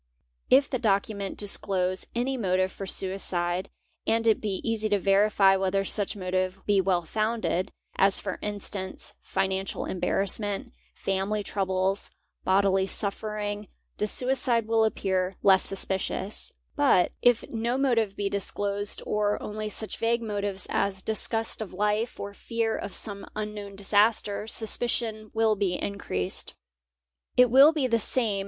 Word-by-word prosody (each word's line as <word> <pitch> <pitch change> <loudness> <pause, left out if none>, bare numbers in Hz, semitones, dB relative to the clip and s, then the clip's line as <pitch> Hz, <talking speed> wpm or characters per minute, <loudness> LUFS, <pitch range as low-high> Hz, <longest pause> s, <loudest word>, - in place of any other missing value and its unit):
If 275 +2 +6
the 255 - -2
document 200 -2 0
disclose 190 -2 0
any 255 +3 0
motive 185 -5 +1
for 195 - -7
suicide 185 -2 -2 0.4
and 225 0 +2
it 220 -1 +3
be 200 -3 -2
easy 220 -1 0
to 205 - +3
verify 195 0 +4
whether 195 +1 0
such 205 +1 +1
motive 185 0 -1
be 200 -2 +3
well 180 -2 +1
founded, 215 0 -1 0.3
as 195 0 +5
for 200 - -4
instance, 200 -2 -5
financial 190 0 -2
embarassment, 200 - -1 0.2
family 195 +2 -1
troubles, 190 0 -1 0.3
bodily 190 0 +3
suffering, 205 0 -2 0.3
the 210 - 0
suicide 250 -1 +2
will 225 0 +3
appear 190 -3 -1
less 190 -1 +6
suspicious; 190 +1 -1 0.2
but 280 - +4
if 245 -2 +3
no 235 +2 -1
motive 230 -7 +1
be 200 -1 -1
disclosed 200 +1 -1
or 210 0 0
only 215 0 -4
'such 215 0 -1
vague 230 +1 +1
motives 205 -3 -2
as 190 -1 0
disgust 225 +1 0
of 200 -4 -6
life 210 +4 0
or 200 0 -5
fear 225 +1 -2
of 200 - -4
some 200 -2 -5
unknown 210 -2 -5
disaster, 205 +1 +2
suspicion 220 -1 -1
will 220 -1 +3
be 195 -3 0
increased. 95 - -3 0.8
It 250 -2 +6
will 275 +4 +8
be 305 -5 0
the 230 -2 +2
same. 215 -2 +1
205 Hz, 135 wpm, -27 LUFS, 195-220 Hz, 0.8 s, will